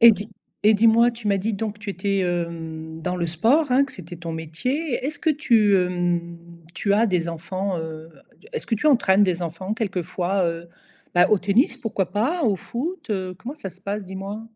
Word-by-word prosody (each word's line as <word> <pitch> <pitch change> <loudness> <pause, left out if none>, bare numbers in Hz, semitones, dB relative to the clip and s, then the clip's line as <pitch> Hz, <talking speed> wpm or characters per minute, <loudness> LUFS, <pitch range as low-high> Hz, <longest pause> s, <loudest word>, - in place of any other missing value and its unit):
Et 235 0 +11
dis 205 +2 -5 0.3
et 215 +1 +6
dis-moi, 230 +2 +5
tu 235 -2 -9
m'as 200 -1 +3
dit 215 +3 -1
donc 210 0 -4
tu 210 - -9
étais, 195 +1 -1
hem, 165 -3 -3
dans 180 +2 -2
le 170 -1 -1
sport, 230 - +3
hein, 255 +2 +5
que 275 - -8
c'était 175 -1 -8
ton 170 0 -6
métier, 240 - -2
est-ce 305 +4 -3
que 320 - +2
tu, 230 -9 +3
hem, 175 -2 0 0.4
tu 200 - 0
as 220 +3 +4
des 175 -4 0
enfants, 185 +3 -3
heu? 160 0 -7 0.3
D - - -16
est-ce 465 - -4
que 230 - +1
tu 225 +8 -1
entraînes 210 -9 +5
des 180 -3 +2
enfants 170 +4 -4
quelquefois, 185 -3 -1
heu, 170 0 -4 0.5
bah, 175 0 +6
au 210 - +5
tennis, 205 - +2
pourquoi 195 -5 -2
pas? 265 - 0
Au 210 -6 +2
foot, 310 - -5
heu? 185 -3 -2
Comment 245 +8 -6
ça 200 -11 -6
se 185 - -15
passe, 205 +1 -3
dis-moi? 195 +3 -6
195 Hz, 205 wpm, -23 LUFS, 175-225 Hz, 0.5 s, Et